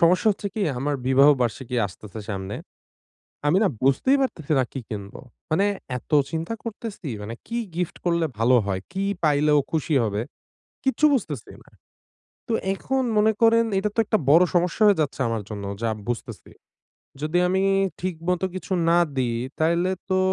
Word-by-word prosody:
সমস্যা 180 +5 +4
হচ্ছে 200 0 -3
কী 215 - -3 0.2
আমার 145 +2 -1
বিবাহ 135 +2 +6
বার্ষিকী 120 +1 -2
আসতেছে 105 +3 -10
সামনে। 95 0 -4 0.9
আমি 160 +5 +4
না - - +4 0.2
বুঝতেই 140 - +3
পারতেছি 160 - -2
না - - +4
কী 135 - -5
কিনব! 100 -2 -6 0.4
মানে 190 +6 +3 0.3
এত 125 - -15 0.2
চিন্তা 165 +7 -3
করতেছি 220 -5 -6
মানে 105 +3 -6
কী 235 - -3 0.2
গিফট 180 -1 -2
করলে 170 -1 +2
ভালো 120 +3 +4
হয়? 95 -2 -2
কী 190 +1 -2 0.2
পাইলে 150 0 +3
ও - - +2
খুশি 155 -1 0
হবে? 105 0 -1 0.6
কিচ্ছু 265 +3 +3
বুঝতেছি 150 - -4
না। - - -22 0.8
তো 230 - -1 0.2
এখন 265 +6 -1
মনে 215 +1 +5
করেন 230 0 +5
এটা 210 +2 +1
তো - - 0
একটা 215 - +2
বড় 165 +5 +7
সমস্যা 175 +5 +1
হয়ে 205 - +5
যাচ্ছে 145 -2 -2
আমার 115 -1 -1
জন্য 100 -2 -6 0.2
যা 115 - +1 0.2
বুঝতেছি। 120 -1 -5 0.7
যদি 155 +3 0
আমি 190 +1 +1 0.4
ঠিকমত 180 +1 -1
কিছু 185 - -7 0.2
না 170 - +5 0.2
দিই 120 -3 0 0.2
তাইলে 170 +3 +2 0.2
তো 185 - +2
160 Hz, 165 wpm, -24 LUFS, 125-195 Hz, 0.9 s, বড়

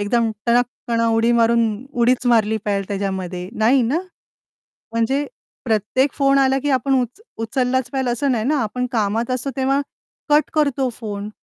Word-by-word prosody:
एकदम 225 +2 +1 0.2
टणक 240 +1 +4 0.2
कण 230 -1 +1
उडी 230 0 +2
मारून 235 0 +3 0.3
उडीच 245 +1 +2
मारली 220 -2 +3
पाहिजे 200 -2 -1
त्याच्यामध्ये 190 -3 -3
नाही 245 +4 +4
ना? 255 +8 +1 0.9
म्हणजे 265 +6 0 0.4
प्रत्येक 240 +4 +1
फोन 275 -1 +3
आला 270 0 +3
की 290 - 0
आपण 270 +1 +1
उच 250 - -5 0.2
उचललाच 250 +2 0
पाहिजे 265 -2 0
असं 265 +3 0
नाही 220 -3 -1
ना, 295 +4 +1
आपण 250 +3 -2
कामात 225 +2 0
असतो 255 +2 -1
तेव्हा 270 +1 +1 0.5
कट 295 +1 +3
करतो 280 -4 +1
फोन. 210 -3 -6
240 Hz, 160 wpm, -20 LUFS, 220-265 Hz, 0.9 s, टणक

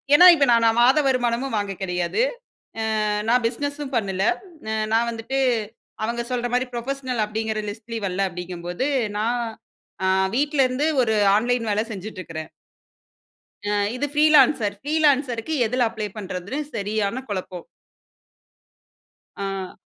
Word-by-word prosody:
ஏன்னா, 355 - +8
இப்ப 285 -3 +3
நா - - +7
நான் 225 +1 +3
மாத 265 +5 +5
வருமானமும் 250 -1 0
வாங்க 205 -1 -2
கிடையாது. 180 - -1 0.6
அ - - -1 0.5
நான் 245 +1 +3
பிசினஸ்ஸும் 285 +3 -3
பண்ணல. 195 -4 -1 0.5
அ - - -1 0.2
நான் 230 +1 +3
வந்துட்டு 230 +4 -3 0.7
அவங்க 235 +2 -1
சொல்றமாரி 245 +1 0
புரொபஷனல் 255 -1 -2
அப்பிடிங்கிற 220 0 -2
லிஸ்ட்லயும் 225 0 -5
வல்ல, 185 0 -2
அப்பிடிங்கம்போது, 180 +4 -4 0.2
அ - - -8
நான் 235 +3 0 0.6
அ - - +2 0.3
வீட்ல 290 +1 +1
இருந்து 255 +4 0 0.2
ஒரு 220 -2 +1 0.2
ஆன்லைன் 240 +1 0
வேலை 210 +1 +1
செஞ்சுட்டு 200 0 -7
இருக்கறேன். 160 -2 -7 1.2
அ - - +1 0.2
இது 265 +3 -1
ப்ரீலான்சர் 300 -7 +5
ப்ரீலான்சர்க்கு 285 -3 +1
எதில 245 +2 +1
அப்ளை 215 -2 -4
பண்றதுன்னு 200 +5 -5 0.2
சரியான 210 +3 -1
குழப்பம். 185 -3 -5 1.7
ஆ. 195 -1 -4
230 Hz, 125 wpm, -23 LUFS, 205-260 Hz, 1.7 s, ஏன்னா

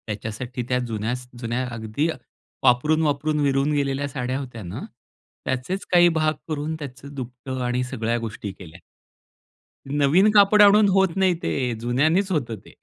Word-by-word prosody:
त्याच्यासाठी 115 +4 -5
त्या 125 0 +2
जुन्यास 115 +3 -3
जुन्या 120 +2 -2
अगदी 115 +7 -2
अ, - - -6 0.5
वापरून, 135 +5 +3
वापरून 150 0 0
विरून 140 +1 +2
गेलेल्या 140 -1 0
साड्या 130 -2 -3
होत्या 125 -5 -7
ना, 90 - -6 0.6
त्याचेच 130 +10 -2
काही 175 -1 +6
भाग 155 0 +2
करून 155 0 -3
त्याचं 140 0 -9
दुपटं 130 0 -6
आणि 125 +1 0
सगळ्या 120 -2 -2
गोष्टी 110 -3 -5
केल्या. 90 -1 -12 1.1
नवीन 145 +8 +4
कापड 210 0 +6
आणून 205 +1 +7
होत 190 0 +4
नाही 190 -1 +3
ते, 125 -3 -1
जुन्यांनीच 155 - +1
होतं 130 -9 -1
ते - - -15
135 Hz, 150 wpm, -23 LUFS, 120-155 Hz, 1.1 s, आणून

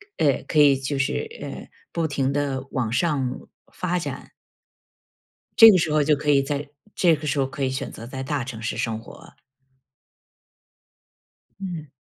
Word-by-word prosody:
呃， 140 -4 +1
可 155 - +1
以 140 -2 +6
就 135 +1 -3
是， 135 - -1
呃， - - -7 0.2
不 165 -1 -1
停 140 -2 0
地 140 -2 -2
往 125 -4 -1
上 140 -3 +1 0.4
发 - - -28 0.5
展。 - - -18 1.3
这 225 -1 +11
个 185 - +5
时 160 -3 0
候 150 - +3
就 150 +1 +3
可 150 +1 -2
以 140 - +5
在 145 +1 -3 0.3
这 170 -3 +4
个 155 +1 -8
时 145 0 0
候 135 - +3
可 135 +1 -5
以 130 - +1
选 130 - -4
择 115 - -9
在 130 +2 -6
大 140 -2 -2
城 115 -3 -7
市 115 - -3
生 110 -1 -2
活。 165 +8 -14 2.2
嗯。 170 -6 -5
140 Hz, 180 characters per minute, -24 LUFS, 130-155 Hz, 2.2 s, 这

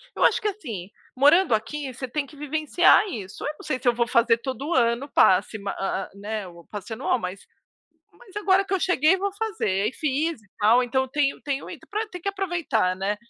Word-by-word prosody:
Eu - - 0
acho - - +4
que, 425 - -1
assim, 230 - -5 0.3
morando 290 +2 +5
aqui, 255 +5 -2
você 260 +1 -6
tem 285 +3 -2
que 290 - -16
vivenciar 310 +7 +3
isso, 200 - -7
eu 300 - -2
não - - -11
sei 260 - -1
se - - -5
eu 240 - +5
vou 235 0 0
fazer 235 -1 +3
todo 270 +6 -4
ano 235 +1 +2
o - - -18
passe, 195 +3 +3
ma 200 0 -4
hã, 195 0 -2
né, 205 -1 -5
o 170 -1 -14
passe 210 +2 -7
anual, 250 +1 0
mas 185 0 -6 0.7
mas 430 -5 -18
agora 390 -1 +3
que 390 - -3
eu 380 - +2
cheguei, 355 +1 +3
vou 400 +1 -2
fazer. 305 - -1
E - - -4
fiz 305 0 -1
e 210 - -25
tal, 230 +4 +5
então 260 +2 0
tenho 280 +1 0
tenho 280 -1 -3 0.5
tem 360 -2 -8
que 395 - -1
aproveitar, 340 - 0
né, 195 +2 -1
260 Hz, 210 wpm, -25 LUFS, 215-330 Hz, 0.7 s, morando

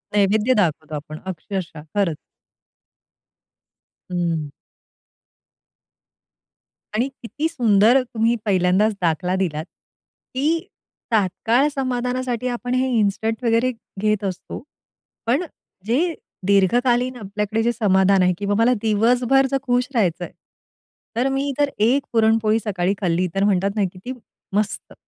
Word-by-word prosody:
नैवेद्य 210 +5 +3
दाखवतो 155 -3 -1
आपण 155 +1 -7
अक्षरशः, 180 -3 -5
खरंच. 180 -7 +1 2.0
हं. 165 -4 -1 2.5
आणि 245 +5 +1
किती 295 +7 -2
सुंदर 235 -2 +4
तुम्ही 230 -1 0
पहिल्यांदाच 190 +2 +3
दाखला 175 +2 0
दिलात, 160 -4 -2
की 300 - -4 0.5
तात्काळ 225 +6 +2
समाधानासाठी 250 -1 -1
आपण 245 0 -3
हे 260 +1 +2
इन्स्टंट 220 +3 0
वगैरे 230 +2 +2 0.3
घेत 215 0 +1
असतो. 190 +5 -5 0.6
पण 270 +10 +1 0.4
जे 315 +10 +1 0.3
दीर्घकालीन 240 +6 +3
आपल्याकडे 210 +1 -2
जे 240 - +2
समाधान 195 -3 +3
आहे 180 0 +3
किंवा 205 0 -1
मला 235 +2 +4
दिवसभर 245 +5 +3
जर 275 - +2
खुश 245 -1 +1
राहायचंय. 180 -6 0 0.8
तर 250 +3 +1
मी 275 +1 -1
जर 290 -1 +3
एक 250 +6 +3
पुरणपोळी 220 0 +3
सकाळी 195 -3 -1
खाल्ली, 180 0 +1
तर 195 - +2
म्हणतात 195 -1 +2
ना, 205 - +2
किती 190 +8 -8 0.4
मस्त, 210 0 -2
220 Hz, 110 wpm, -22 LUFS, 190-245 Hz, 2.5 s, सुंदर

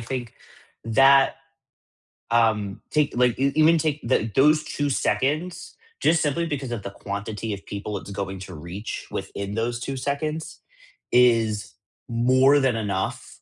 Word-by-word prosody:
think 120 0 -5 0.5
that, 135 +4 +5 0.9
um, 110 -4 +1
take, 150 -2 +1
like 125 -1 +2
e 140 +1 +2
even 160 +2 +5
take, 155 -1 -1
eh, 115 -3 +2
those 150 +3 +5
2 145 0 -2
seconds, 155 +6 -1 0.3
just 160 0 +3
simply 155 +3 0
because 140 -5 -4
of 110 -4 -4
the 100 - -4
quantity 105 +2 -5
of 100 - -8
people 100 0 -5
it's 100 - -9
going 95 -1 -4
to 95 -1 -9
reach 85 +7 -7
within 100 +1 -5
those 120 +1 -1
2 135 +2 -4
seconds, 150 +4 -3 0.5
is 115 -4 +3 0.4
more 130 +4 +4
than 130 -3 +2
enough 100 -3 -3
120 Hz, 145 wpm, -24 LUFS, 105-140 Hz, 0.9 s, that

